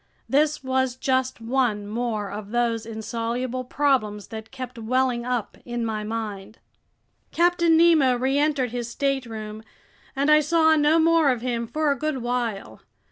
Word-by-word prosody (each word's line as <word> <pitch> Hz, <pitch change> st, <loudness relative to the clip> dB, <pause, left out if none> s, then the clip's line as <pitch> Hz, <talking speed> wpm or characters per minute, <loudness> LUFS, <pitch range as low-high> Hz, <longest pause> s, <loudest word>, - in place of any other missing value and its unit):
This 295 Hz, +1 st, +1 dB
was 260 Hz, -1 st, 0 dB
just 260 Hz, -1 st, 0 dB
one 230 Hz, -3 st, 0 dB
more 215 Hz, -2 st, -3 dB
of 205 Hz, 0 st, -7 dB
those 230 Hz, -1 st, 0 dB
insoluble 235 Hz, +3 st, -3 dB
problems 250 Hz, -7 st, 0 dB
that 220 Hz, 0 st, -8 dB
kept 255 Hz, -2 st, -8 dB
welling 245 Hz, +1 st, 0 dB
up 245 Hz, -4 st, -3 dB
in 240 Hz, -1 st, -3 dB
my 215 Hz, -1 st, -3 dB
mind! 215 Hz, -1 st, -5 dB, 0.7 s
Captain 340 Hz, -1 st, +3 dB
Nemo 320 Hz, -7 st, +5 dB
reentered 270 Hz, 0 st, +1 dB
his 240 Hz, -1 st, -4 dB
stateroom, 230 Hz, -6 st, -3 dB, 0.5 s
and 280 Hz, +2 st, +2 dB
I 305 Hz, -, +7 dB
saw 320 Hz, +1 st, +3 dB
no 300 Hz, +1 st, +4 dB
more 330 Hz, -2 st, +4 dB
of 250 Hz, -3 st, 0 dB
him 235 Hz, -2 st, -2 dB
for 305 Hz, +3 st, 0 dB
a -, -, +1 dB
good 305 Hz, -2 st, -1 dB
while. 240 Hz, -4 st, -3 dB
250 Hz, 145 wpm, -24 LUFS, 225-280 Hz, 0.7 s, I